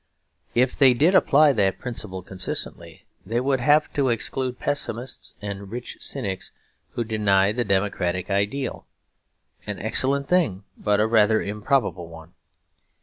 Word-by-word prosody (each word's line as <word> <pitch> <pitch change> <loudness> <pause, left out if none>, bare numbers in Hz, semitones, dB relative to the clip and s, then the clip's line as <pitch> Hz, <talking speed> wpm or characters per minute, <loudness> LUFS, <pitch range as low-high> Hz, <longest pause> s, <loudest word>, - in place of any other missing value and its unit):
If 125 +1 +2
they 130 -3 +5
did 160 +9 +3
apply 150 -5 +5
that 100 -5 +1
principle 105 -7 -6
consistently, 95 0 -5 0.2
they 115 +2 -1
would 135 +1 +1
have 150 +4 +3
to 140 -3 +1
exclude 125 +2 -1
pessimists 130 -3 -3
and 100 -1 -6
rich 120 +3 -6
cynics 95 -10 -4 0.4
who 120 - -1
deny 105 -3 +2
the 120 +3 -1
democratic 95 -2 -1
ideal; 100 +7 -2 0.8
an 105 - -4
excellent 135 +6 0
thing 155 - +1
but 105 -1 +1
a 105 - +4
rather 110 -1 +4
improbable 105 - -1
one. 80 0 -13
110 Hz, 135 wpm, -24 LUFS, 100-130 Hz, 0.8 s, they